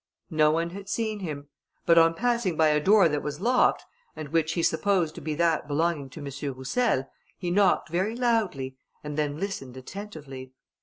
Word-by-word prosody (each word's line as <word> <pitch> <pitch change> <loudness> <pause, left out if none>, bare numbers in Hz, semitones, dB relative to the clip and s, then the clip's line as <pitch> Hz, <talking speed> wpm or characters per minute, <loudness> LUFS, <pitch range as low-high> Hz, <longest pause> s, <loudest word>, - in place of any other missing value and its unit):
No 155 -1 +4
one 165 +2 0
had 195 +1 -9
seen 220 -2 -2
him; 145 -6 -6 0.4
but 170 0 +6
on 165 0 +4
passing 235 -6 0
by 160 -1 +5
a 150 0 +3
door 195 +3 +5
that 150 -2 -1
was 150 0 -5
locked, 245 +5 +2 0.3
and 155 -2 -7
which 160 +1 +1
he 170 - -1
supposed 175 -1 +1
to - - -9
be 155 -1 -3
that 165 -2 +1
belonging 150 -1 0
to 145 - -11
M. 140 0 -5
Roussel, 135 - 0 0.3
he 175 -2 -3
knocked 195 -1 +3
very 190 +7 -1
loudly, 210 - 0 0.3
and 150 -1 -5
then 150 -1 -1
listened 135 -10 -5
attentively. 135 -5 -9
165 Hz, 185 wpm, -27 LUFS, 145-195 Hz, 0.4 s, but